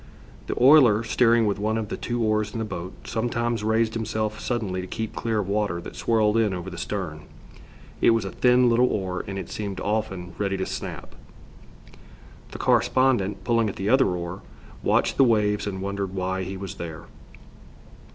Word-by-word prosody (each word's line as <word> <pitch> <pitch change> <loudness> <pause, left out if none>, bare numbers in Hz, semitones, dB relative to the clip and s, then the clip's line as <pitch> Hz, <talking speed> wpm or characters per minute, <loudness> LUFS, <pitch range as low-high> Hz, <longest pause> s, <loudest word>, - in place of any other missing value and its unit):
The - - -3
oiler, 125 -5 +6
steering 115 0 +3
with 100 -1 0
one 110 +2 0
of 110 -2 -3
the - - -3
two 120 -1 -2
oars 110 -1 0
in - - -4
the 110 - -2
boat, 95 -3 -6
sometimes 120 -1 -1
raised 110 +1 +1
himself 110 -1 -2
suddenly 105 -7 -2
to 90 - -7
keep 110 +3 -5
clear 115 -2 -1
of 95 - -6
water 100 -4 0
that 85 - -9
swirled 110 -1 +2
in 105 -4 +2
over 90 +1 -6
the 85 - -8
stern. 85 -6 -4 0.8
It - - +6
was 115 -3 +2
a 95 - -4
thin 125 0 +4
little 120 +1 +4
oar 95 -5 -2
and 95 0 -5
it 95 - -6
seemed 100 -3 -4
often 95 -4 -2
ready 100 -1 0
to 95 - -2
snap. - - -6 1.4
The - - -8
correspondent, 105 -7 +2
pulling 115 0 +2
at - - -6
the 100 +2 -2
other 135 +2 +5
oar, 90 +1 -4 0.4
watched - - +1
the 135 - +6
waves 105 -4 +2
and 95 -2 -4
wondered 100 -1 -3
why 95 0 -2
he 95 +1 -5
was 95 -1 -6
there. 80 -2 -6
105 Hz, 185 wpm, -25 LUFS, 95-115 Hz, 1.4 s, oiler